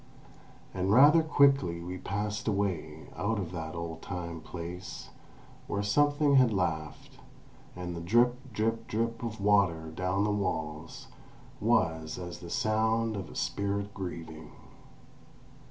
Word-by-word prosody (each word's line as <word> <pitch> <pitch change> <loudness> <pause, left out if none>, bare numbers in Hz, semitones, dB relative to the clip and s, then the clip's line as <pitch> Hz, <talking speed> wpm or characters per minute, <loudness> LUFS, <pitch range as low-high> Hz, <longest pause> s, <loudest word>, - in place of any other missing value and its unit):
And 95 +1 0
rather 145 +8 +8
quickly 140 - +3
we 90 +2 -6
passed 105 +2 -3
away, 90 -7 -2
out 100 +6 -1
of 90 -4 -3
that 80 -1 -5
"old 85 -1 -5
time 85 -3 -5
place"; 90 +3 -7 0.6
where 100 - -1
something 145 +5 +3
had 125 -3 +5
laughed, 80 -6 -3 0.6
and 90 -1 -5
the 85 - -5
drip, 120 +7 +4 0.2
drip, 115 +2 -1
drip 115 +1 -1
of 115 -2 -4
water 95 -6 +2
down 90 +4 0
the 105 - +1
walls 80 -6 -3 0.5
was 80 -1 +1
as 85 -1 -6
the 85 -1 -9
sound 110 +2 +1
of 95 -5 -5
a - - -12
spirit 100 0 -2
grieving. 80 -4 -7
100 Hz, 130 wpm, -30 LUFS, 85-110 Hz, 0.6 s, rather